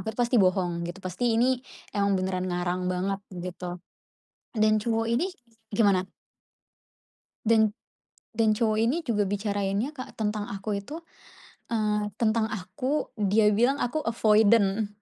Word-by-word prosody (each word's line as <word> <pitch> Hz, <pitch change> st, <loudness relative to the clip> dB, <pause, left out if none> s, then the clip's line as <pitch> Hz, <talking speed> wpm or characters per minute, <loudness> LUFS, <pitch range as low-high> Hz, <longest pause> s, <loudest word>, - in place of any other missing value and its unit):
aku 220 Hz, -, -3 dB
pasti 240 Hz, -2 st, +3 dB
bohong, 180 Hz, -2 st, +1 dB
gitu. 175 Hz, +2 st, -7 dB
Pasti 225 Hz, +6 st, 0 dB
ini 250 Hz, +2 st, +2 dB, 0.3 s
emang 200 Hz, -1 st, +2 dB
beneran 185 Hz, 0 st, -2 dB
ngarang 180 Hz, +1 st, -1 dB
banget 195 Hz, +2 st, -1 dB
gitu, 180 Hz, -1 st, -6 dB, 0.8 s
dan 215 Hz, 0 st, +4 dB
cowok 225 Hz, +1 st, 0 dB
ini 250 Hz, +11 st, +2 dB, 0.5 s
gimana? 195 Hz, -4 st, +3 dB, 1.4 s
Dan 220 Hz, -2 st, +4 dB, 0.6 s
dan 225 Hz, -1 st, +4 dB
cowok 215 Hz, 0 st, +1 dB
ini 240 Hz, +9 st, +2 dB
juga 210 Hz, -7 st, +1 dB
bicarainnya 205 Hz, +4 st, -1 dB
Kak 255 Hz, -, -7 dB
tentang 210 Hz, -1 st, -1 dB
aku 200 Hz, +1 st, -3 dB
itu, 290 Hz, +12 st, -6 dB, 0.7 s
eee, 210 Hz, -2 st, 0 dB
tentang 220 Hz, -1 st, +1 dB
aku 210 Hz, +10 st, -3 dB
dia 210 Hz, 0 st, +3 dB
bilang 240 Hz, +7 st, +3 dB
aku 285 Hz, +5 st, -1 dB
avoidant, 215 Hz, -2 st, +3 dB
210 Hz, 130 wpm, -27 LUFS, 195-230 Hz, 1.4 s, dan